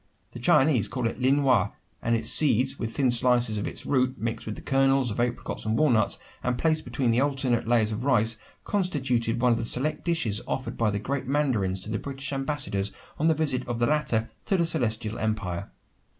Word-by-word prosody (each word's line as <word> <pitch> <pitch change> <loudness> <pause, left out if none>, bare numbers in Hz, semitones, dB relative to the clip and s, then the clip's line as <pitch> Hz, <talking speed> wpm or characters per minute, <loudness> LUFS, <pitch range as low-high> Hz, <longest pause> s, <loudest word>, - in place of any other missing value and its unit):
The 120 - -9
Chinese 130 0 +3
call 125 -1 -3
it 115 - -2
"Lienwha," 130 -6 +3 0.3
and 115 - +1
its 110 -1 -1
seeds 135 0 +3
with 115 -1 -4
thin 135 -3 +3
slices 120 -2 +3
of - - -3
its - - -7
root, 130 -2 +1
mixed 115 +1 -4
with 105 - -4
the - - -10
kernels 135 -2 +2
of 105 - -5
apricots 120 0 -2
and 110 +1 -1
walnuts, 125 -8 +3 0.2
and 125 0 -1
placed 155 +2 +1
between 120 -2 +1
alternate 135 -5 0
layers 115 -2 +2
of 110 +3 -4
ice, 115 -3 +3 0.3
constituted 130 - 0
one 125 0 +3
of 115 - +1
the - - -2
select 130 +6 0
dishes 140 - -1
offered 130 - -3
by 115 -2 +1
the 100 - -1
great 130 +5 -3
mandarins 115 -10 0
to 110 - -7
the 110 - -1
British 140 0 -6
ambassadors 135 -8 -1 0.3
on 155 - +2
the 160 - +3
visit 140 -5 0
of 120 -1 -2
the 120 - +2
latter 120 -6 0
to 195 - +1
the 170 - +2
Celestial 115 -7 0
Empire. 100 -6 -3
125 Hz, 200 wpm, -26 LUFS, 110-140 Hz, 0.3 s, Chinese